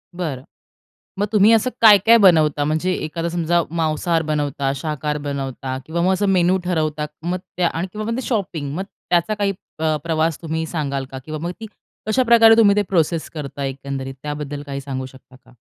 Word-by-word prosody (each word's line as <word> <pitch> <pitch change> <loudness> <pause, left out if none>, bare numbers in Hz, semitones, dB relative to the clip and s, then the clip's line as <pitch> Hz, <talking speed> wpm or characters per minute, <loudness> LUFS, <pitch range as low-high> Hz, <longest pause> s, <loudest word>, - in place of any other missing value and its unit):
बरं. 150 -8 -4 0.8
मग 205 - +2
तुम्ही 210 +1 +5
असं 225 +3 +3
काय-काय 220 +1 +7
बनवता? 155 -7 +4
म्हणजे 155 +5 0
एखादा 165 +1 -3
समजा 170 0 +1
मांसाहार 165 +1 0
बनवता, 145 -3 -1
शाकाहार 150 +1 -3
बनवता 135 -2 -4
किंवा 170 +2 -2
मग 185 +2 +3
असं 205 +1 0
मेनू 185 0 +3
ठरवता, 155 -3 -1 0.2
मग 180 +2 -1 0.2
त्या 175 -1 +3
आणि 170 +4 -3
किंवा 215 0 -5
मग - - -1
ते - - -2
शॉपिंग, 170 - -2
मग 190 - -2 0.3
त्याचा 175 +4 +2
काही 205 -1 0 0.3
प 155 -1 +1
प्रवास 160 -1 0
तुम्ही 160 0 -3
सांगाल 140 -5 -3
का? 130 - -6
किंवा 155 -1 -5
मग 175 - -2
की 225 - -7 0.4
कशाप्रकारे 230 -1 +6
तुम्ही 205 -3 +6
ते 210 - +3
प्रोसेस 165 -2 0
करता, 145 -2 -6
एकंदरीत 135 0 -5
त्याबद्दल 145 -1 -5
काही 140 -1 -5
सांगू 130 -1 -5
शकता 130 0 -16
का? 130 - -20
160 Hz, 180 wpm, -20 LUFS, 145-185 Hz, 0.8 s, काय-काय